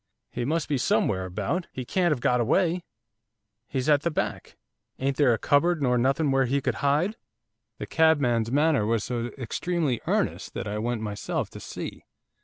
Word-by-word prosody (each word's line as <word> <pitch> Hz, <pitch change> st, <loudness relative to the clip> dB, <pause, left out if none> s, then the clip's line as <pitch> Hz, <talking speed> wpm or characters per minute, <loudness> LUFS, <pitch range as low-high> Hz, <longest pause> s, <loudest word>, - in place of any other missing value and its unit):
He 120 Hz, -, -3 dB
must 160 Hz, +3 st, 0 dB
be 145 Hz, -3 st, 0 dB
somewhere 135 Hz, -, +1 dB
about, 105 Hz, -, -2 dB
he 130 Hz, -, -6 dB
can't 175 Hz, +6 st, +1 dB
have 135 Hz, -5 st, 0 dB
got 125 Hz, 0 st, +2 dB
away, 170 Hz, -, +2 dB, 0.8 s
he's 130 Hz, -1 st, -2 dB
at 145 Hz, -2 st, +4 dB
the 170 Hz, -, 0 dB
back. 155 Hz, -, -3 dB, 0.4 s
Ain't 135 Hz, +1 st, -1 dB
there 135 Hz, -2 st, +4 dB
a 115 Hz, -, +2 dB
cupboard 165 Hz, +7 st, +2 dB
nor 125 Hz, -3 st, +2 dB
nothing 135 Hz, +4 st, +2 dB
where 135 Hz, 0 st, +3 dB
he 135 Hz, +3 st, +1 dB
could -, -, -1 dB
hide?' 155 Hz, +9 st, +1 dB, 0.6 s
The -, -, -5 dB
cabman's 135 Hz, -8 st, +2 dB
manner 145 Hz, -3 st, +3 dB
was 115 Hz, -2 st, +1 dB
so 120 Hz, -1 st, -2 dB
extremely 145 Hz, +2 st, -1 dB
earnest -, -, -1 dB
that -, -, -3 dB
I 105 Hz, +1 st, -3 dB
went 120 Hz, 0 st, -2 dB
myself 105 Hz, -1 st, -3 dB
to -, -, -9 dB
see. -, -, -7 dB
135 Hz, 180 wpm, -26 LUFS, 120-160 Hz, 0.8 s, at